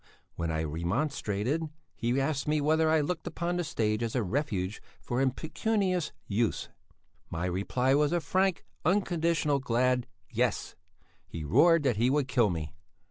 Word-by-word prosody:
When 85 -1 -3
I 80 0 -1
remonstrated, 105 - -1 0.3
he 120 +3 0
asked 140 0 -1
me 150 0 +2
whether 155 +2 +3
I 160 -1 +4
looked 165 +3 -3
upon 175 +1 -2
the 175 - 0
stage 110 -7 -1
as 115 0 -2
a 125 - +2
refuge 105 -4 -2 0.2
for 125 +2 -2
impecunious 180 - 0
youths. 110 +2 -1 0.6
My 85 +2 -3
reply 100 +9 +1
was 145 +1 +3
a 175 - +2
frank, 185 +3 0 0.2
unconditional 170 -5 +1
glad 125 -1 +1 0.2
Yes. - - 0 0.5
He 80 - -6
roared 155 - +5
that 125 -6 +1
he 120 +3 +3
would 140 -1 +1
kill 120 -4 +3
me. 80 -3 -4
135 Hz, 150 wpm, -29 LUFS, 105-160 Hz, 0.6 s, roared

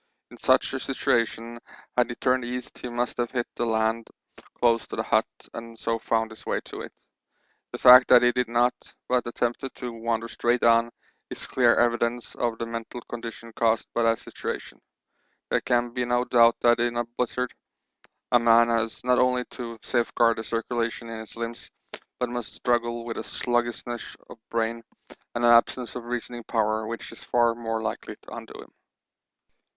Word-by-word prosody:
In - - -12
such - - +3
a - - -2
situation 115 0 -1 0.4
had 125 -1 +3
he 120 - -4
turned 130 0 +1
east 125 +1 -5
he 125 - -6
must 120 +1 -2
have 120 -1 0
hit 120 -2 -1
the 120 - -2
land 110 0 0 0.3
somewhere - - -18
close 115 -1 +3
to - - -6
the - - -1
hut - - +2 0.3
and 115 0 -8
so 115 0 -1
found 115 0 0
his 110 - -11
way - - -1
to - - -8
it. - - -8 0.8
The - - -5
fact 125 0 +9
that 125 -1 +7
he 120 - +5
did 125 0 0
not, 120 +1 +3 0.3
but 125 -1 +1
attempted 120 +2 -2
to 125 -2 -6
wander 115 0 -2
straight 120 +1 0
on, 115 0 +5 0.4
is - - -7
clear 120 -2 +3
evidence 120 0 +1
of 120 -2 -1
the 115 - -3
mental 115 +1 -6
condition 115 -1 -7
caused 115 -1 +1
by 120 - +1
that 115 0 +3
situation. - - -7 0.7
There - - +2
can 120 -1 +1
be 125 0 -1
no 120 0 +1
doubt 120 -2 +5
that 120 0 +4
in 120 0 0
a 120 - +1
blizzard 125 +1 -2 0.8
a 120 - +6
man 115 0 +5
has 115 -1 -1
not 125 0 +3
only 125 0 +2
to 115 -2 -7
safeguard 115 -1 +2
the - - -4
circulation 115 +1 -2
in 115 -1 -6
his 110 - -10
limbs, 115 0 -6 0.5
but 125 - -1
must 120 -2 -5
struggle 120 -1 0
with 115 - -5
a - - -3
sluggishness 120 -1 -2
of - - -11
brain 115 0 -1 0.5
and 120 0 +1
an 120 - +7
absence 120 +1 +3
of 125 -2 -6
reasoning 120 0 -5
power 110 -1 0
which 115 +1 -6
is 115 - -12
far 120 -1 +2
more 115 -1 -3
likely 110 -1 -4
to - - -11
undo - - -9
him. - - -22
120 Hz, 185 wpm, -26 LUFS, 115-120 Hz, 0.8 s, fact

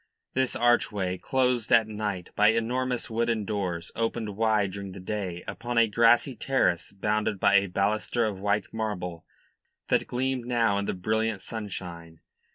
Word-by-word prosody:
This 130 -1 0
archway, 105 -6 +1
closed 125 -2 0
at 115 -1 +6
night 105 -4 -4
by 105 - +5
enormous 125 +3 0
wooden 115 -2 0
doors, 95 -5 -3
opened 115 -2 -2
wide 110 -3 +2
during 100 -1 -7
the 95 - -9
day 95 -3 -4
upon 120 0 -4
a 115 -1 +6
grassy 120 +4 +4
terrace 115 -10 0
bounded 105 +1 -1
by 100 +1 +5
a 100 0 +2
baluster 105 +5 0
of 105 -3 -3
white 100 0 -1
marble 90 -7 -4 0.6
that - - +2
gleamed 125 -1 -2
now 115 -5 +2
in 100 - -2
the - - -2
brilliant 110 +2 -1
sunshine. 85 -7 -7
105 Hz, 155 wpm, -27 LUFS, 100-115 Hz, 0.6 s, at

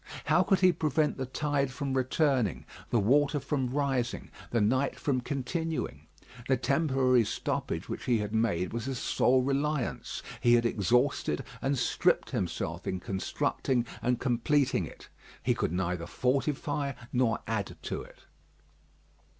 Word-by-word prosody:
How - - +4
could 195 -2 +2
he 185 -1 +7
prevent 155 -2 0
the 130 -1 -3
tide 140 0 0
from 135 0 -3
returning, 130 - +1 0.2
the 120 - +3
water 145 +7 +3
from 135 -2 -1
rising, 135 -3 -1 0.2
the 120 - +1
night 130 +6 +1
from 130 -3 0
continuing? 160 +5 -3 0.4
The 130 - +3
temporary 130 -2 +3
stoppage 100 - -3
which - - -5
he 120 -2 +3
had 105 0 -3
made 100 -6 +1
was 115 0 -3
his 135 -1 -3
sole 130 +2 +2
reliance. 140 0 -1 0.2
He 120 0 +6
had 120 0 +2
exhausted 115 - +1 0.2
and 135 +1 0
stripped - - +1
himself - - -3
in 95 - -1
constructing 115 +6 -1 0.2
and 125 0 +1
completing 135 +3 +1
it; - - -13 0.4
he - - +3
could - - -1
neither 90 -1 -2
fortify 140 - 0 0.2
nor 120 -3 +2
add 100 -6 -3
to - - -3
it. - - -14
130 Hz, 140 wpm, -30 LUFS, 115-140 Hz, 0.4 s, he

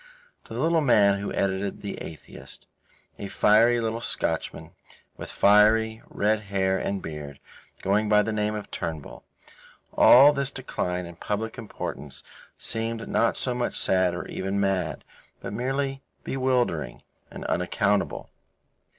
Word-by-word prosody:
To - - -9
the - - -3
little 165 0 +2
man 100 -7 +4
who 100 - -4
edited 100 +1 -2
The 100 - -5
Atheist, 80 - -8 0.5
a 100 - -5
fiery 115 +5 +4
little 115 0 -2
Scotchman, - - -2 0.4
with - - -8
fiery, 110 +2 +4
red 105 +1 +1
hair 95 -1 +1
and 100 -1 -3
beard, 75 -3 -7 0.4
going 105 +2 +1
by 105 0 +5
the 110 - -2
name 105 0 -1
of 105 - -7
Turnbull, 80 -4 -5 0.7
all 140 +4 +8
this 140 -1 -1
decline 90 -10 -3
in 85 -1 -11
public 110 +4 -3
importance 75 -9 -6 0.3
seemed 115 0 -3
not 115 - +1
so 125 - -1
much 120 0 -2
sad 95 -2 +2
or 90 - -5
even 95 +1 -3
mad, 95 -5 -1 0.4
but - - -6
merely 135 +3 -2 0.2
bewildering 130 - -1 0.3
and - - -9
unaccountable. 100 +3 0
105 Hz, 135 wpm, -26 LUFS, 95-115 Hz, 0.7 s, all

